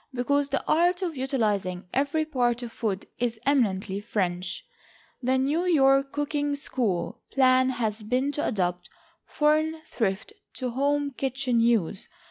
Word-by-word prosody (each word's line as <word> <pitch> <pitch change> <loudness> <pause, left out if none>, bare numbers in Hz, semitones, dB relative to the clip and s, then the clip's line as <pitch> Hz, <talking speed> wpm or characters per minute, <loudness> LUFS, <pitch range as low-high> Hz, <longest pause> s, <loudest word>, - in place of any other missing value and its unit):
Because 285 +3 +1
the 275 - -1
art 350 +3 +3
of 340 -4 -2
utilizing 210 -9 -1
every 285 +4 +1
part 245 -5 0
of 235 - -6
food 210 -4 -3
is 235 -2 -1
eminently 205 -8 +1
French, 185 -4 -2 0.6
the 260 +1 +2
NEW 295 +7 +1
YORK 275 -4 +4
COOKING 290 0 -1
SCHOOL 235 - -2
plan 260 -1 +4
has 225 -4 -2
been 250 +6 0
to 290 - -2
adapt 180 -5 -1 0.4
foreign 310 +1 +1
thrift 210 -6 -2 0.2
to 255 -1 -3
home 285 +3 0
kitchen 265 -2 -1
use. 230 -7 +1
255 Hz, 135 wpm, -26 LUFS, 220-285 Hz, 0.6 s, YORK